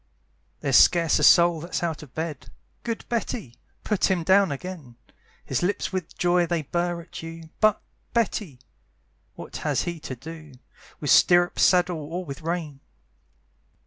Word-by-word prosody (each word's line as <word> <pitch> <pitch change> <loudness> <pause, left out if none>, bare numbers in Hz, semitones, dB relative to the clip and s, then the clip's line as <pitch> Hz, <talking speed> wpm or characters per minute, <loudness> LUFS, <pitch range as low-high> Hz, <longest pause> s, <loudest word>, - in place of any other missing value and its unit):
There's - - +4
scarce 170 -3 +5
a - - 0
soul 170 -1 +6
that's 175 +1 -4
out 160 -3 -2
of 140 -5 -14
bed; 150 -7 -5 0.3
Good 230 -1 -4
Betty! 225 - -3 0.3
put 210 -2 +1
him 180 -3 +1
down 190 +1 +4
again; 145 -4 -7 0.5
His - - -1
lips 190 +2 -1
with 185 -3 -5
joy 175 0 +2
they 170 -2 -1
burr 175 +3 -2
at 165 - -10
you, 165 0 -9
But, 215 -1 +4 0.3
Betty! 205 - -2 0.7
what - - -8
has - - -1
he 170 -1 -4
to 135 -4 -7
do 155 +2 -11 0.5
With 145 - -1
stirrup, 175 -1 +5
saddle, 180 -2 +3
or 165 +5 -5
with 140 +1 -8
rein? 160 -4 -4
170 Hz, 150 wpm, -25 LUFS, 155-180 Hz, 0.7 s, soul